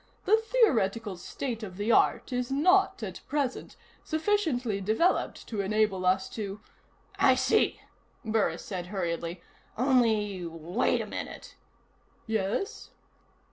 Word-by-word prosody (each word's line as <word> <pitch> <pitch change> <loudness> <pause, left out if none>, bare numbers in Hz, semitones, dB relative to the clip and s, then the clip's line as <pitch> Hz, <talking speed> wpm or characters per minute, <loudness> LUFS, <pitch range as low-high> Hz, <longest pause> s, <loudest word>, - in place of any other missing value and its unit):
The 435 - +5
theoretical 230 - +1
state 230 +6 -5
of 190 -4 -7
the 205 +3 0
art 255 - +3
is 250 +1 -2
not, 375 +7 +3
at - - -6
present, 280 -3 -2 0.3
sufficiently 315 - 0
developed 220 - +1
to 215 -4 -1
enable 195 -2 +1
us 190 +1 +2
to 205 -2 -5 0.3
" - - -36 0.3
"I - - +6
see," - - +2 0.4
Burris 220 -1 0
said 180 -3 -5
hurriedly. 170 -2 -3 0.3
"Only 220 -7 +2
wait 170 +6 -1
a - - -4
minute." - - -7 0.7
"Yes?" 220 - -2
220 Hz, 120 wpm, -28 LUFS, 190-270 Hz, 0.7 s, I